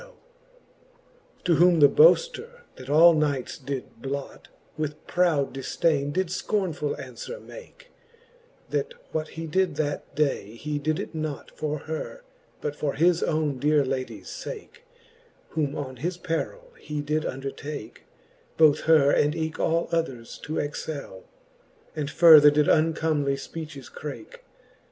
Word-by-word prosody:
XVL - - -15 1.3
To 175 -2 +3
whom 175 -1 +5
the 145 - +9
boafter, 485 - +3 0.2
that 130 - -10
all 165 +4 +7
knights 145 -5 -1
did 135 -4 -6
blot, 140 +1 -5 0.3
With 150 -1 -4
proud 165 -6 +1
difdaine 140 +2 0
did 185 +2 -1
fcornefull 180 -6 -2
anfwere 135 - -8
make; - - -13 0.8
That 475 +2 -2 0.2
what 155 0 -2
he 165 - -4
did 185 +4 0
that 145 -1 -3
day, 135 -8 -1
he 150 +4 -3
did 155 +2 0
it - - -6
not 155 -2 -5
For 150 -1 -3
her, 160 - -6 0.4
but 145 - -3
for 145 -1 -2
his 170 +2 +3
owne 155 -4 0
dear 150 +1 +3
ladie's 130 0 -4
fake> 460 0 -8 0.7
Whom 150 -2 -1
on 130 -3 -5
his 175 +7 -3
perill 475 - -4
he 150 -1 -4
did 150 +1 -1
undertake, 135 -1 -6 0.5
Both 155 -2 +6
her 155 -3 +5
and 150 +2 +2
eke 160 -1 -3
all 165 +1 +1
others 135 -9 -3
to 155 - -3
excell: 145 -8 -5 0.7
And 150 -2 -3
further 155 -3 +8
did 150 0 +2
uncomely 155 -3 +2
fpeaches 150 -1 -8
crake. 335 - -8
155 Hz, 135 wpm, -26 LUFS, 145-170 Hz, 1.3 s, the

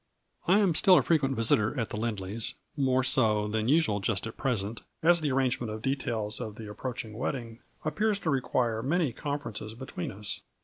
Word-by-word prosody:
I 185 +3 +6
am 200 -5 +3
still 185 +3 +6
a - - +4
frequent 140 -5 +2
visitor 115 +2 +2
at 115 - -2
the - - -3
Lindley's, 105 -1 -2 0.2
more 130 -2 +2
so 110 -5 +3
than 110 +1 -1
usual 145 -8 +3
just 100 0 0
at 115 - -6
present, 115 -4 -2 0.2
as 170 0 +5
the 150 - 0
ar 130 - +1
rangement 125 -3 +1
of 110 0 -6
details 115 -6 -2
of 105 -2 -5
the 110 -1 -8
approaching 110 +1 -5
wed 120 +7 -1
ding 115 -3 -7 0.3
appears 205 +7 +1
to 160 - 0
require 125 -4 0
many 150 0 +1
conferences 125 -7 -4
be 130 +3 -8
tween 90 - -5
us. 100 +1 -5
120 Hz, 195 wpm, -29 LUFS, 110-140 Hz, 0.3 s, I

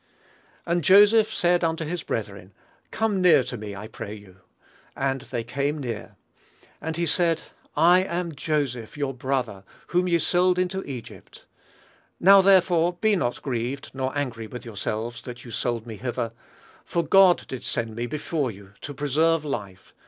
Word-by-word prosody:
"And 170 -1 0
Joseph 210 +5 +6
said 175 0 +2
unto 160 -1 0
his 170 +2 -3
brethren, 100 -6 -5 0.3
Come 215 -4 0
near 175 -7 +6
to 125 +1 -6
me, 105 -3 -7
I 105 +2 -7
pray 105 -1 -7
you. 100 -3 -15 0.6
And 135 -1 -1
they 120 -3 -4
came 140 +5 -2
near. 120 -7 -6 0.7
And 160 +1 -4
he 170 - 0
said, 165 0 +1 0.3
I 175 +2 +6
am 175 -2 -3
Joseph 135 -5 -2
your 140 -2 -2
brother, 125 -6 -2 0.3
whom 180 +1 +1
ye 170 -1 +3
sold 180 +2 +2
into 185 +1 -1
Egypt. 130 -5 -10 0.7
Now 195 +2 +8
therefore 180 -3 +4
be 210 +4 +2
not 125 -10 -2
grieved, 125 +1 -3
nor 130 +1 -3
angry 115 -6 -3
with 125 +2 -9
yourselves, 110 +1 -4
that 120 -1 -9
you 120 - -9
sold 115 0 -2
me 110 -2 -8
hither; 120 +1 -3 0.5
for 170 - -1
God 185 +3 +5
did 130 - -6
send 115 -2 -3
me 120 +1 -3
before 150 -1 -2
you, 100 -2 -12
to 145 - -7
preserve 155 +3 +1
life.... 100 -9 -6
140 Hz, 160 wpm, -25 LUFS, 115-175 Hz, 0.7 s, Now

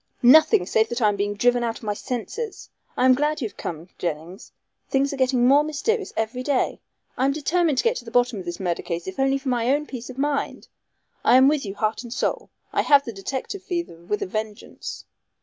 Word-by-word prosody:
"Nothing, 250 - +7
save 220 +3 +2
that 240 - -2
I 215 -3 +4
am 205 - -1
being 205 +1 -1
driven 245 +3 +2
out 230 -1 -2
of - - -16
my 210 -1 -1
senses. 275 - -5 0.3
I 250 - +3
am 260 - +7
glad 295 +3 0
you 240 - -1
have 200 - -16
come, 165 +1 -6
Jennings. 170 +3 -5 0.4
Things 275 +1 +1
are - - -2
getting 255 -2 +2
more 285 +3 +6
mysterious 310 +9 -1
every 225 +3 -1
day. 265 0 0 0.4
I 260 - +2
am 275 - +2
determined 310 0 +1
to - - +2
get 470 +1 +2
to - - -8
the - - -7
bottom 245 -2 +1
of 185 - -8
this 175 0 -5
murder 175 -3 -1
case 170 -1 -4
if 190 - -6
only 270 0 +3
for 270 -1 -4
my 240 -1 +1
own 295 +2 +1
peace 250 -3 -8
of 255 - -9
mind. 285 0 -2 0.5
I - - +5
am 260 +1 +7
with 290 -6 +1
you 195 - -5
heart 215 +2 -1
and 240 -2 -10
soul. - - -2 0.2
I - - +3
have 285 -1 +5
the 230 - -5
detective 265 - -5
fever 345 - -4
with 210 +4 -2
a - - -2
vengeance. 215 +2 -6
245 Hz, 235 wpm, -24 LUFS, 210-280 Hz, 0.5 s, Nothing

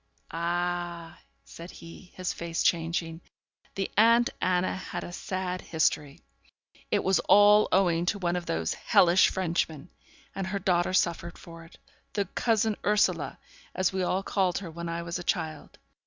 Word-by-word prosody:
'Ah!' 175 0 -3 0.2
said 170 +1 -11
he, 170 +2 -13
his 185 -1 -3
face 170 0 -3
changing, 165 0 0 0.5
'the 195 -1 -3
aunt 230 +2 +5
Anna 180 0 +1
had 180 -1 -6
a - - -7
sad 185 0 -4
history. 150 -3 -1 0.7
It - - +1
was 190 0 +3
all 205 +1 +7
owing 175 -3 +2
to 205 - +1
one 175 -2 -1
of 175 -1 -4
those 80 0 -1
hellish 180 +1 +4
Frenchmen; 165 -3 -2 0.4
and 195 -1 -4
her 200 +1 -2
daughter 180 -1 +1
suffered 170 -1 0
for 165 -1 -12
it 165 - -17 0.4
the 200 -2 0
cousin 220 +2 0
Ursula, 210 0 +1 0.4
as 185 0 +1
we 190 - -1
all 185 +1 0
called 190 -3 0
her 185 -4 -6
when 170 +1 -6
I 170 0 -3
was 170 +1 -4
a - - -6
child. 160 -4 -3
175 Hz, 155 wpm, -28 LUFS, 170-190 Hz, 0.7 s, all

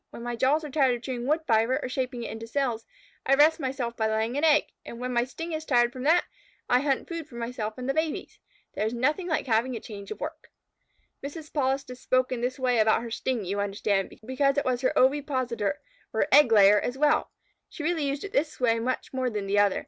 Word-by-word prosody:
When 235 - -10
my 240 0 -3
jaws 275 +6 +2
are 300 - -6
tired 265 -4 +3
of 240 - -10
chewing 250 -1 -4
wood 310 +3 +2
fibre 230 +1 +2
or - - -4
shaping 250 -1 -3
it - - -5
into 225 +1 -7
cells, 235 -3 -2 0.4
I 275 - +4
rest 310 +4 +5
myself 260 -4 -3
by 220 -1 0
laying 220 +3 -1
an 290 - -1
egg. 305 -1 +5 0.2
And 235 - -9
when 250 0 -3
my 240 0 +2
sting 330 +6 -7
is 310 0 -3
tired 240 -4 +2
from 255 - -7
that, 335 +4 +4 0.4
I 250 - +4
hunt 275 -1 0
food 335 -3 -5
for 245 - -14
myself 230 -2 -4
and 250 0 -5
the 275 - +1
babies. 315 0 -3 0.3
There - - -2
is 230 - -3
nothing 300 +9 0
like 315 - 0
having 240 +1 +1
a - - -4
change 200 -3 -9
of - - -6
work." - - -7 0.7
Mrs. 300 +2 -8
Polistes 265 -3 -1
spoke 255 0 +1
in 245 -2 -2
this 250 +1 -2
way 250 -3 +1
about 220 +1 +3
her 235 - -7
sting, 235 -2 -2
you 200 +3 -2
understand, 200 -1 0 0.2
because 275 +3 +1
it 285 - +1
was 250 -1 0
her 260 - +2
ovipositor, 260 -4 +1 0.3
or - - +1
egg 280 -4 +7
layer, 205 -1 +7
as 245 +5 -3
well. 295 +1 +2 0.4
She 315 - -8
really 320 -2 0
used 280 +1 -3
it 400 0 -7
in - - +5
this 305 -1 -11
way 230 -2 +2
much 255 +4 -3
more 260 -1 0
than 210 -3 -3
the 200 +1 +2
other. 205 -2 +3
255 Hz, 240 wpm, -27 LUFS, 230-285 Hz, 0.7 s, egg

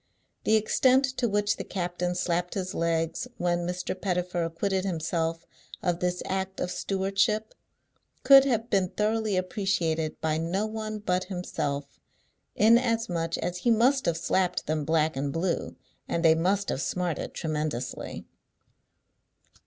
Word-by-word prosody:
The 220 - +4
extent 255 +5 +4
to 240 - +1
which 205 0 +1
the - - -4
captain 180 -1 -2
slapped 175 0 -1
his 185 -2 -3
legs, 165 +7 -1
when 175 0 0
Mr. 180 0 -2
Pettifer 180 -2 -1
acquitted 185 +3 -1
himself 165 -2 -2 0.4
of 175 -2 0
this 180 0 -1
act 190 0 -3
of 180 - -2
stewardship, 195 +4 0 0.7
could 275 -1 +9
have 235 -3 0
been 190 -2 +2
thoroughly 215 -1 0
appreciated 180 -5 -1
by 155 0 0
no 180 +6 -1
one 215 0 -4
but 185 -3 -1
himself; 145 -6 -4 0.6
inasmuch 225 -7 +2
as 175 +1 -3
he 235 - 0
must 250 +4 +3
have 165 -1 +1
slapped 180 +1 0
them 155 -1 -1
black 160 -1 +2
and 140 +1 -2
blue, 170 +3 -2 0.3
and 170 0 -1
they 160 - +8
must 190 +5 +1
have 135 - -1
smarted 175 +4 -2
tremendously. 150 -6 -3
180 Hz, 135 wpm, -27 LUFS, 165-205 Hz, 0.7 s, could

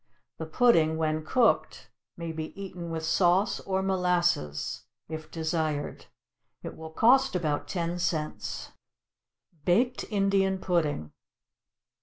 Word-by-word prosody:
The 160 - -4
pudding 160 -5 +4
when 155 -1 0
cooked 235 +8 +1 0.3
may 170 -1 -4
be 160 +4 -6
eaten 180 -3 -6
with 160 -1 -3
sauce 180 +4 +3
or 190 0 -1
molasses, 180 - 0 0.2
if 155 0 -7
desired; 160 -2 -2 0.6
it - - -6
will 160 0 -8
cost 250 +8 +4
about 155 -5 -1
ten 175 -1 -2
cents. 160 -3 -3 0.9
=Baked 235 +10 +2
Indian 195 -2 +2
Pudding. 155 - -1
170 Hz, 110 wpm, -28 LUFS, 160-190 Hz, 0.9 s, pudding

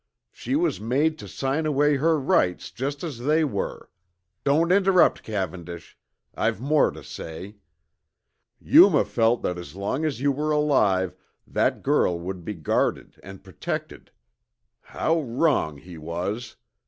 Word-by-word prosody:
She 270 - -3
was 345 +4 0
made 145 +8 0
to - - -9
sign 140 +4 -2
away 145 0 +2
her 160 +2 +2
rights 90 -9 +1
just 140 +4 -4
as 150 -8 -5
they 155 +6 +2
were. 125 -10 -4 0.5
Don't 160 +5 +2
interrupt, 190 -2 +4
Cavendish 90 -5 -6 0.4
I've - - -1
more 145 +4 +3
to - - -10
say. 95 +6 -8 1.0
Yuma - - +6
felt 115 +1 +1
that 90 0 -2
as 85 -2 -10
long 100 +10 -2
as 145 -7 -2
you 140 +2 +2
were 150 +3 -2
alive, 105 -12 +2 0.3
that - - 0
girl 85 -1 +2
would 90 +1 -6
be 105 +4 -5
guarded 80 -4 -1
and 95 0 -12
protected. 95 -6 -6 0.7
How 165 0 -1
wrong 125 - 0
he 85 +3 -12
was! 90 +9 -4
125 Hz, 140 wpm, -24 LUFS, 90-150 Hz, 1.0 s, Yuma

